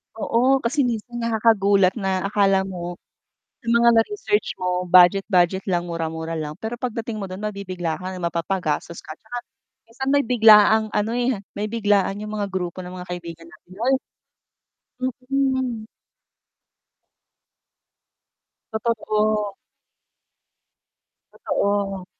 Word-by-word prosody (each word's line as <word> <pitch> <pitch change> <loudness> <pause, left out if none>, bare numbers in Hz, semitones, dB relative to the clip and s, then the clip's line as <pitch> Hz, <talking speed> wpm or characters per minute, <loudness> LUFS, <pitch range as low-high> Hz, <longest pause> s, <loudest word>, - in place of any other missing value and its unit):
Oo, 255 +4 +2
kasi 255 +3 +1
minsan 240 +1 -4
nakakagulat 205 -4 +3
na 190 -1 -1
akala 195 -1 +2
mo 175 -2 -6 0.7
sa - - -19
mga 235 0 +5
na-research 225 - +1
mo 180 0 -1
budget-budget 185 0 +4
lang, 175 -1 0
mura-mura 165 0 -4
lang, 150 -1 -4
pero 225 +2 -4
pagdating 230 -2 -4
mo 200 - -4
dun 185 - -7
mabibigla 185 -6 -4
ka 185 +1 -6
na 185 - -7
mapapagastos 170 -1 -2
ka, 155 - -9
tsaka 230 +3 -9 0.5
minsan 265 +4 -5
may 285 -2 +3
biglaang 220 -2 +6
ano, 210 +2 0
eh, 245 -3 0 0.2
may 210 +1 -2
biglaan 205 -3 +1
yung 210 0 -6
mga 205 -1 -2
grupo 185 0 -3
ng 180 - -8
mga 180 - -9
kaibigan 170 -2 -7
natin 170 +2 -18 0.2
ay 270 - +4 1.1
Mm. 260 -2 -1 2.8
Totoo. 215 -2 0 1.9
Totoo. 195 -2 -1
205 Hz, 115 wpm, -22 LUFS, 180-230 Hz, 2.8 s, biglaang